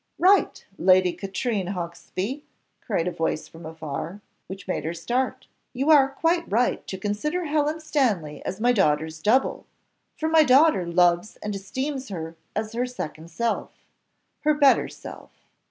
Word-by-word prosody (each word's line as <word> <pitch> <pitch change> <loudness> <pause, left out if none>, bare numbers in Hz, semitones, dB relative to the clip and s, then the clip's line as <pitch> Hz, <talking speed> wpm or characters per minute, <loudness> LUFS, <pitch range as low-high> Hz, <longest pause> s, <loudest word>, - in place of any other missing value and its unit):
"Right, 390 +3 +3
Lady 185 -1 +4
Katrine 200 -1 -2
Hawksby," 185 - -5 0.4
cried 185 -6 -1
a - - 0
voice 160 -2 -2
from 165 0 -11
afar, 160 +3 -6 0.3
which 195 +1 -9
made 185 - -2
her 165 +2 -3
start; 255 +9 -2 0.3
"you 270 +5 +2
are 275 -3 +6
quite 330 +4 0
right 240 +4 +1
to 190 - -5
consider 215 - -2
Helen 305 +1 0
Stanley 220 - -1
as 190 - -4
my 240 +2 +3
daughter's 160 -6 +1
double, 245 +8 +1 0.5
for 315 - -1
my 320 0 +5
daughter 270 - +5
loves 175 +3 +2
and 210 0 -3
esteems 260 +7 -4
her 165 -3 -6 0.2
as 215 +1 -3
her 245 +2 -1
second 160 -9 -7
self 230 +8 -2 0.7
her 305 0 +2
better 285 -2 +4
self. - - -11
210 Hz, 150 wpm, -25 LUFS, 175-275 Hz, 0.7 s, are